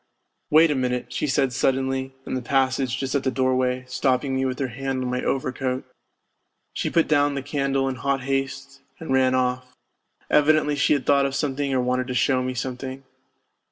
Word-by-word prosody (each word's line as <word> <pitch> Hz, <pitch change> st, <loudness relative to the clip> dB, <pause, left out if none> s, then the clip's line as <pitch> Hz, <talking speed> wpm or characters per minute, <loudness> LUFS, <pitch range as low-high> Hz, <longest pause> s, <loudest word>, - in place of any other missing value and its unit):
" -, -, -52 dB
Wait 160 Hz, 0 st, +7 dB
a -, -, +1 dB
minute," 125 Hz, -1 st, -2 dB
she 150 Hz, -, -1 dB
said 135 Hz, -2 st, +1 dB
suddenly, 130 Hz, +1 st, 0 dB
in -, -, -5 dB
the 130 Hz, -, -1 dB
passage 130 Hz, 0 st, +1 dB
just 135 Hz, 0 st, -3 dB
at 140 Hz, -2 st, 0 dB
the 130 Hz, -, +1 dB
doorway, 130 Hz, -1 st, 0 dB
stopping 130 Hz, +1 st, 0 dB
me 130 Hz, 0 st, 0 dB
with 130 Hz, -1 st, -2 dB
her 135 Hz, -2 st, -2 dB
hand 130 Hz, +2 st, -3 dB
on 125 Hz, -, -2 dB
my 125 Hz, 0 st, -1 dB
overcoat. 130 Hz, -1 st, -2 dB, 0.9 s
She -, -, -2 dB
put 165 Hz, -, +2 dB
down 145 Hz, -2 st, +2 dB
the 140 Hz, -, -3 dB
candle 140 Hz, -1 st, 0 dB
in 130 Hz, -1 st, -3 dB
hot 135 Hz, +1 st, -1 dB
haste 135 Hz, 0 st, -3 dB, 0.2 s
and 160 Hz, -5 st, -3 dB
ran 130 Hz, -1 st, +3 dB
off; 125 Hz, 0 st, -1 dB, 0.5 s
evidently 150 Hz, 0 st, +3 dB
she 145 Hz, -, +3 dB
had 140 Hz, -3 st, -1 dB
thought 140 Hz, -1 st, +4 dB
of 135 Hz, -, -5 dB
something 140 Hz, -1 st, -1 dB
or 130 Hz, -1 st, +2 dB
wanted 125 Hz, 0 st, 0 dB
to 125 Hz, -, -3 dB
show 130 Hz, +1 st, +2 dB
me 130 Hz, 0 st, -3 dB
something. 130 Hz, +1 st, -5 dB
130 Hz, 195 wpm, -24 LUFS, 130-140 Hz, 0.9 s, Wait